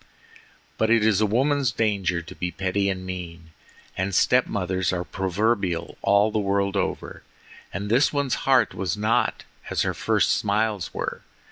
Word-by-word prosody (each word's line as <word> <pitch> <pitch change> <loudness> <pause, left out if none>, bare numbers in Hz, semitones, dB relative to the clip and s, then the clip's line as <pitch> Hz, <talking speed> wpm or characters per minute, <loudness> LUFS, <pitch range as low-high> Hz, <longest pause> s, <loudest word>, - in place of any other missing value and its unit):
But 110 - +2
it 115 -2 +4
is 110 -2 +3
a 105 - +3
woman's 135 +3 +1
danger 100 -6 0
to 80 - -10
be 90 - -3
petty 95 +2 -1
and 95 -1 -4
mean, 85 -3 -7 0.4
and 95 0 -2
step 125 +5 +3
mothers 95 -2 -1
are 90 -1 -2
proverbial 95 -1 -1
all 100 +2 +3
the 110 - 0
world 100 0 0
over, 100 - -3 0.5
and 100 +2 -4
this 125 +7 +3
one's 140 -3 -1 0.2
heart 130 -6 +4
was 95 +2 -2
not 110 +2 +1 0.3
as - - 0
her - - -1
first - - +1
smiles 105 -2 0
were. - - -4
100 Hz, 160 wpm, -24 LUFS, 95-110 Hz, 0.5 s, it